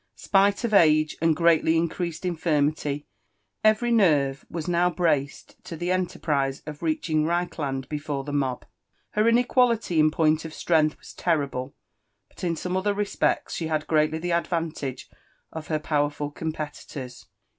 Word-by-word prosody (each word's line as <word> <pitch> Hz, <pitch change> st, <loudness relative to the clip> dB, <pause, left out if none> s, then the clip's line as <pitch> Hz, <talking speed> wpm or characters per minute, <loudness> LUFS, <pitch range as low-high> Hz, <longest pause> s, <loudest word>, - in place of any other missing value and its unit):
Spilf 200 Hz, +4 st, +2 dB
^f 215 Hz, -, -6 dB
age 155 Hz, -4 st, +4 dB
and 165 Hz, -2 st, +3 dB
grpally 165 Hz, -1 st, +4 dB
increased 170 Hz, +1 st, -2 dB
infirmity, 150 Hz, -4 st, 0 dB, 0.6 s
every 215 Hz, +3 st, +3 dB
nerve 145 Hz, -11 st, +3 dB
was 165 Hz, -1 st, -5 dB
now 175 Hz, 0 st, +2 dB
braced 155 Hz, -6 st, -2 dB
to 165 Hz, -, -7 dB
\hQ -, -, -16 dB
eolerprise 155 Hz, -6 st, -1 dB
of 150 Hz, -1 st, -8 dB
reaching 155 Hz, -1 st, 0 dB
Reichlaad 155 Hz, -5 st, -2 dB
tefore 145 Hz, -2 st, -4 dB
the 145 Hz, -, -5 dB
mob. 135 Hz, -3 st, -1 dB, 0.5 s
Qer 210 Hz, +1 st, +3 dB, 0.2 s
ioeqiiatity 235 Hz, -9 st, +2 dB
^n 155 Hz, -, +5 dB
paipt 155 Hz, 0 st, +2 dB
of 160 Hz, -1 st, -8 dB
strength 155 Hz, -3 st, +2 dB
was -, -, -13 dB
lorrilile, 140 Hz, -6 st, -1 dB, 0.6 s
but -, -, -14 dB
in 170 Hz, -2 st, 0 dB
some 180 Hz, +3 st, -4 dB
otbti 200 Hz, +2 st, 0 dB
respeota 205 Hz, 0 st, 0 dB, 0.2 s
aUo 155 Hz, -1 st, -1 dB
\^ 155 Hz, -1 st, +3 dB
ir^atly 160 Hz, -, -4 dB
the 175 Hz, +2 st, -3 dB
advantage 165 Hz, -6 st, -2 dB, 0.5 s
of 160 Hz, -1 st, -7 dB
her 155 Hz, -, 0 dB
powerful 145 Hz, -1 st, -1 dB
oompeiitora. 150 Hz, -4 st, -6 dB
160 Hz, 145 wpm, -25 LUFS, 150-175 Hz, 0.6 s, ^n